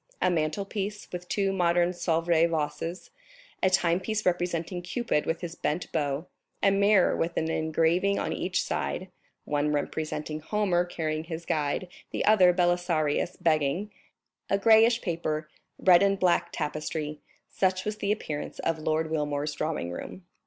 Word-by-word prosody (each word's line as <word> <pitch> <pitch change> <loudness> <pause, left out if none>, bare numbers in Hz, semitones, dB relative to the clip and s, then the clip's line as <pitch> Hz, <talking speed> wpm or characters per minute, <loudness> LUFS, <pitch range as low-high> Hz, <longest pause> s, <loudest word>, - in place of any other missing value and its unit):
A 185 - +2
mantle 160 +3 0
piece, 205 0 -4
with 180 0 -7
two 195 -1 +1
modern 175 -1 +3
Sèvres 170 -1 +2
vases, 165 +2 -3 0.5
a 185 - +4
timepiece 185 +4 +1
representing 175 0 -1
Cupid 180 -3 -1
with 165 +1 -1
his 170 -2 -5
bent 165 0 -3
bow, 145 0 -1 0.4
a 195 - +5
mirror 200 -1 +4
with 170 +1 -2
an 160 0 0
engraving 165 +5 +1
on - - -1
each 185 0 -1
side—one 150 -5 -3
representing 155 +1 -3
Homer 180 +1 +1
carrying 155 -2 -3
his 165 0 -6
guide, 150 +4 -1 0.2
the - - -2
other, 195 -4 +6
Belisarius 175 -3 +1
begging—a 170 +6 -2
grayish 225 +3 +5
paper; 155 -3 -2 0.3
red 180 -2 +6
and 195 0 +3
black 180 -2 +2
tapestry—such 155 +5 -3
was 210 0 -2
the 200 -1 -1
appearance 155 -8 -4
of 165 -1 -1
Lord 155 +1 -1
Wilmore's 150 -1 -1
drawing 150 - -2
room. 175 - -8
170 Hz, 140 wpm, -28 LUFS, 155-185 Hz, 0.5 s, other